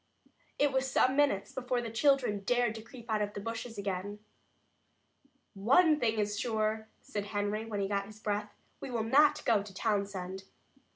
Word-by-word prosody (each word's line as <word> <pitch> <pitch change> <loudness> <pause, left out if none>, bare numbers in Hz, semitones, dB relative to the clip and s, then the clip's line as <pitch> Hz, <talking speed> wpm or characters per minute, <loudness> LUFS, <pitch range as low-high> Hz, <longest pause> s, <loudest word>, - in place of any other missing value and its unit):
It 290 -1 +3
was 265 0 0
some 260 +1 +3
minutes 275 -9 +2
before 250 -1 -1
the 235 -2 -4
children 250 -3 +2
dared 240 +2 +1
to 225 - -7
creep 235 +1 -13
out 215 -2 0
of 205 0 -2
the - - -3
bushes 230 +1 -5
again. 200 0 -3 1.4
"One 295 - +4
thing 225 -3 +1
is 205 0 -1
sure," 220 -1 -1
said 205 -1 -4
Henry, 205 +1 -2
when 210 -3 -3
he 195 - 0
got 200 0 -1
his 215 0 -13
breath. 210 -1 -2 0.3
"We - - -6
will 235 -3 -1
not 285 +7 +4
go 220 -4 +4
to 200 -1 -10
Townsend." 195 -3 -2
220 Hz, 175 wpm, -31 LUFS, 205-245 Hz, 1.4 s, One